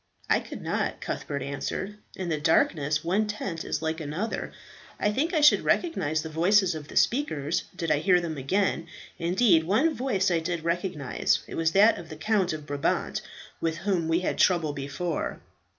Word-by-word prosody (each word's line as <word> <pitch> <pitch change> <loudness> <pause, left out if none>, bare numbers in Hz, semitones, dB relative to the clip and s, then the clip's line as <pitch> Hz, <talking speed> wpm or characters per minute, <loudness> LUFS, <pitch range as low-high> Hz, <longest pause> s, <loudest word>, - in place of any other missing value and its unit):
"I - - +5
could - - -9
not," - - -1
Cuthbert 140 -1 -4
answered; 185 +8 -4 0.2
"in 185 -2 -4
the 155 -2 0
darkness 150 -1 +2
one 195 +6 +1
tent 190 -5 -4
is 155 - -3
like 160 +1 -1
another. 160 +9 -3 0.5
I 210 - +2
think 300 +9 0
I 320 -4 +1
should 295 - +6
recognize 160 - 0
the - - -5
voices 180 +4 +3
of 155 -2 -7
the - - -11
speakers 170 - +1
did 165 -3 -2
I 150 - +3
hear 180 +2 +4
them 170 -2 -4
again; 165 +4 0 0.3
indeed, 175 0 +3
one 225 - +2
voice 205 -9 0
I 170 - +2
did 165 0 -3
recognize, 170 -5 0
it - - -10
was 165 0 0
that 210 +4 +5
of 165 - -10
the 155 - -7
Count 195 0 +1
of 155 -1 -6
Brabant, 145 -1 -1 0.4
with 165 0 -1
whom 175 -2 0
we 165 +2 +2
had - - -2
trouble 170 -5 +3
before." 145 +5 -3
170 Hz, 180 wpm, -27 LUFS, 155-195 Hz, 0.5 s, should